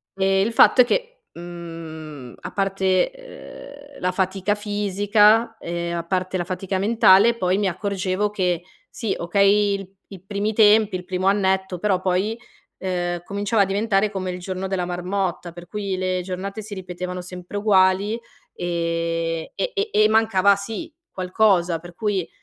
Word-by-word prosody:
Uhm, 190 Hz, 0 st, 0 dB, 0.2 s
il 230 Hz, -, -1 dB
fatto 250 Hz, -, +6 dB
è -, -, +5 dB
che, -, -, -2 dB
mhmm, 165 Hz, -6 st, -9 dB
a -, -, -7 dB
parte, 195 Hz, -, +1 dB
ehm, 285 Hz, -, -12 dB
la 180 Hz, -, +1 dB
fatica 190 Hz, +2 st, 0 dB
fisica 210 Hz, +2 st, +2 dB
e 170 Hz, 0 st, -4 dB
a 170 Hz, -1 st, -2 dB
parte 185 Hz, +2 st, -2 dB
la 175 Hz, -, -1 dB
fatica 185 Hz, +1 st, -3 dB
mentale 220 Hz, +1 st, +5 dB
poi 185 Hz, -1 st, +1 dB
mi 205 Hz, -1 st, +1 dB
accorgevo 195 Hz, +1 st, -1 dB
che, 180 Hz, -4 st, -1 dB, 0.3 s
sì 225 Hz, -5 st, -3 dB
okay 200 Hz, +3 st, +3 dB
il 195 Hz, -1 st, -9 dB, 0.2 s
i 190 Hz, -3 st, -10 dB
primi 205 Hz, +2 st, -2 dB
tempi, 215 Hz, -1 st, +5 dB
il 180 Hz, -, -10 dB
primo 185 Hz, +1 st, -2 dB
annetto, 190 Hz, -2 st, +1 dB
però 190 Hz, -1 st, +1 dB
poi, 190 Hz, +5 st, 0 dB, 0.4 s
ehm, 175 Hz, -2 st, -2 dB
cominciava 200 Hz, +3 st, 0 dB
a -, -, 0 dB
diventare 200 Hz, +1 st, +1 dB
come 185 Hz, -2 st, -3 dB
il 180 Hz, -, -6 dB
giorno 185 Hz, +1 st, -4 dB
della 190 Hz, -1 st, -1 dB
marmotta, 180 Hz, 0 st, -3 dB
per 175 Hz, 0 st, -11 dB
cui 200 Hz, -3 st, -3 dB
le 185 Hz, 0 st, -1 dB
giornate 195 Hz, +3 st, -5 dB
si 210 Hz, 0 st, -8 dB
ripetevano 180 Hz, -1 st, -6 dB
sempre 180 Hz, +1 st, -9 dB
uguali, 200 Hz, +1 st, +3 dB, 0.3 s
ehm, 165 Hz, -1 st, -2 dB
e -, -, -2 dB
e 420 Hz, 0 st, -1 dB
e 215 Hz, 0 st, +5 dB
mancava 210 Hz, -3 st, +4 dB
sì, 225 Hz, +11 st, -6 dB, 0.2 s
qualcosa, 180 Hz, -2 st, +1 dB
per 175 Hz, +1 st, -12 dB
cui 200 Hz, -4 st, -1 dB
190 Hz, 160 wpm, -22 LUFS, 180-210 Hz, 0.4 s, fatto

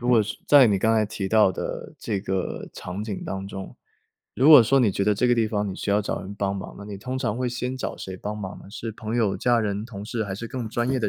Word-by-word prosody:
如 120 Hz, -, -3 dB
果 115 Hz, -3 st, +5 dB
是 105 Hz, -, -5 dB
在 140 Hz, -4 st, +8 dB
你 100 Hz, -3 st, +2 dB
刚 110 Hz, +3 st, +3 dB
才 110 Hz, -1 st, +3 dB
提 100 Hz, -2 st, -4 dB
到 110 Hz, -2 st, +5 dB
的 -, -, -5 dB
这 100 Hz, -4 st, -2 dB
个 95 Hz, -2 st, -3 dB
场 90 Hz, +3 st, -6 dB
景 105 Hz, -2 st, -5 dB
当 95 Hz, 0 st, -4 dB
中， 95 Hz, -1 st, -8 dB, 0.6 s
如 135 Hz, +5 st, +5 dB
果 145 Hz, -6 st, +11 dB
说 135 Hz, +4 st, +3 dB
你 110 Hz, -, +4 dB
觉 100 Hz, +1 st, -1 dB
得 105 Hz, -, +3 dB
这 125 Hz, -, +1 dB
个 120 Hz, -, +5 dB
地 115 Hz, -2 st, +2 dB
方 105 Hz, -1 st, -1 dB
你 -, -, -5 dB
需 -, -, -3 dB
要 105 Hz, +1 st, +3 dB
找 -, -, -3 dB
人 100 Hz, +2 st, -8 dB
帮 100 Hz, -1 st, -1 dB
忙， 95 Hz, -, -7 dB
那 100 Hz, -, -9 dB
你 100 Hz, -1 st, -7 dB
通 130 Hz, +6 st, -4 dB
常 120 Hz, -3 st, -1 dB
会 125 Hz, -, 0 dB
先 125 Hz, +1 st, -3 dB
找 -, -, -4 dB
谁 95 Hz, -, -7 dB
帮 105 Hz, +3 st, -5 dB
忙 100 Hz, -2 st, -6 dB
呢？ -, -, -14 dB
是 110 Hz, +2 st, -6 dB
朋 110 Hz, +2 st, -4 dB
友、 110 Hz, -5 st, +1 dB
家 120 Hz, -2 st, +2 dB
人、 105 Hz, 0 st, -2 dB
同 105 Hz, -4 st, -8 dB
事 115 Hz, -1 st, -2 dB
还 95 Hz, -, -4 dB
是 115 Hz, +4 st, -6 dB
更 120 Hz, -2 st, -4 dB
专 120 Hz, +3 st, -1 dB
业 135 Hz, -, +1 dB
的 110 Hz, -, 0 dB
110 Hz, 310 characters per minute, -25 LUFS, 100-120 Hz, 0.6 s, 果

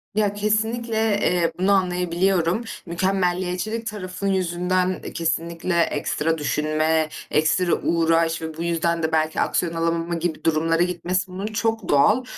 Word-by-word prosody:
Ya, 210 Hz, -1 st, +2 dB
kesinlikle, 220 Hz, +1 st, 0 dB
eee, 175 Hz, -2 st, +2 dB
bunu 190 Hz, +2 st, +2 dB
anlayabiliyorum. 180 Hz, +1 st, +1 dB, 0.2 s
Mükemmeliyetçilik 185 Hz, +4 st, -1 dB
tarafın 200 Hz, -2 st, -4 dB
yüzünden, 185 Hz, 0 st, 0 dB
eee, -, -, -7 dB
kesinlikle 170 Hz, +1 st, -1 dB
ekstra 160 Hz, +1 st, 0 dB
düşünme, 155 Hz, +1 st, 0 dB, 0.2 s
ekstra 160 Hz, +3 st, +2 dB
uğraş 165 Hz, 0 st, +2 dB
ve 160 Hz, -1 st, -6 dB
bu 165 Hz, -, -3 dB
yüzden 170 Hz, 0 st, 0 dB
de 160 Hz, -, 0 dB
belki 155 Hz, 0 st, +1 dB
aksiyon 170 Hz, -2 st, 0 dB
alamama 165 Hz, +1 st, -1 dB
gibi 165 Hz, -1 st, -3 dB
durumlara 165 Hz, +1 st, +2 dB
gitmesi, 180 Hz, +1 st, -2 dB
bunun 190 Hz, +2 st, -5 dB
çok 220 Hz, -1 st, -2 dB
doğal. 210 Hz, -, +4 dB
175 Hz, 130 wpm, -23 LUFS, 165-195 Hz, 0.2 s, doğal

